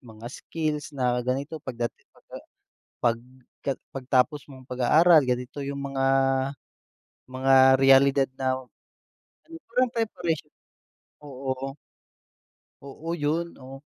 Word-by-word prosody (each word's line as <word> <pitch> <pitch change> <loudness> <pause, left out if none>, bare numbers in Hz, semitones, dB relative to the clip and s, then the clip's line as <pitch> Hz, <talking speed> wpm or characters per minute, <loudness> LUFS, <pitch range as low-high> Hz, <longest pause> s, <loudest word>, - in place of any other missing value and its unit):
mga 115 -2 -14
skills 155 -2 -3
na 125 -1 +1
ganito 135 +5 -3
pagda 120 -3 -4 0.3
pagka - - -13 0.7
pag 115 -1 +2 0.7
pagtapos 135 +2 0
mong 130 -2 -13
pag-aaral 155 +7 +5
ganito 125 +3 -2
yung 140 0 -4
mga 135 -1 0 1.2
mga 130 +1 0 0.3
realidad 135 0 +5
na, 130 -1 -1 1.1
parang 250 +1 +1
preparation 175 -10 -2 0.7
oo. 135 -1 -5 1.1
Oo, 140 +4 -10
yun 165 +2 -1
oh, 135 0 -11
135 Hz, 95 wpm, -26 LUFS, 130-150 Hz, 1.2 s, pag-aaral